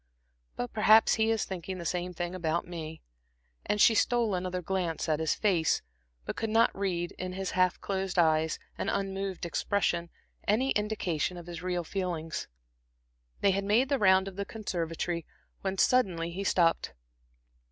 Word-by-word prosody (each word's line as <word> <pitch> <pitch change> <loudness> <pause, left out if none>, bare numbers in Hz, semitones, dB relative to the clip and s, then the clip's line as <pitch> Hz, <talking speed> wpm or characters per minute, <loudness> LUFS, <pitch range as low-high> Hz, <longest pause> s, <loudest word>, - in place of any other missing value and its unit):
But 245 - -4
perhaps 215 +1 +6
he 220 0 +2
is 225 -2 +1
thinking 185 0 -5
the 170 - -7
same 180 +2 -2
thing 175 0 -4
about 170 -2 -1
me." 160 -2 -7 0.6
And 210 - +1
she 225 - +7
stole 230 0 +2
another 180 0 -2
glance 180 -3 -2
at 155 -1 +1
his 160 -1 +1
face, 180 -7 +2 0.4
but - - -4
could 225 - -2
not 225 +1 +3
read, 180 -3 -1
in 185 0 -4
his 190 0 -3
half 185 -1 +2
closed 190 -1 -2
eyes 160 -2 +3 0.2
and - - -1
unmoved 195 -2 -2
expression, 170 -1 0 0.4
any 250 +6 +2
indication 185 -5 -1
of 175 - -9
his 175 -1 -7
real 180 -1 -1
feelings. 170 -3 -3 0.9
They 200 - +4
had 195 +1 0
made 225 +7 +3
the 280 -2 +1
round 190 -1 +5
of 195 -1 -8
the 200 - -1
conservatory, 170 -5 -3 0.4
when 195 0 -2
suddenly 185 -9 +2
he 190 +3 -4
stopped. 170 -3 +2
185 Hz, 165 wpm, -29 LUFS, 170-200 Hz, 0.9 s, she